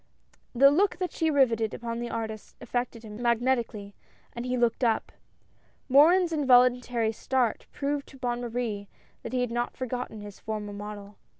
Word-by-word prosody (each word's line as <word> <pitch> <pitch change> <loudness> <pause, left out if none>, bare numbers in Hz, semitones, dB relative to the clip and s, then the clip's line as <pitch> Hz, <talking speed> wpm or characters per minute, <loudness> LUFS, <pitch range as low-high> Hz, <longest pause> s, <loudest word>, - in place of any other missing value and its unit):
The 275 +3 +7
look 385 +7 +2
that 365 -1 -2
she 325 -1 0
riveted 235 -7 +2
upon 230 0 -4
the 240 0 -4
artist 220 -2 -5
affected 245 -2 -3
him 215 +1 -9
magnetically, 235 -4 0 0.4
and 235 +1 -5
he 250 0 0
looked 240 +1 +1
up. 225 -2 +1 0.8
Morin's 335 +6 +6
involuntary 250 -5 +3
start, 245 0 -1
proved 285 0 -2
to 270 - -14
Bonne 245 -2 -2
Marie 230 -4 -3 0.3
that - - -7
he 255 -1 0
had 245 -2 -1
not 240 +1 -2
forgotten 250 -4 -4
his 205 -1 -10
former 210 -1 -5
model. 205 0 -8
240 Hz, 160 wpm, -27 LUFS, 220-260 Hz, 0.8 s, The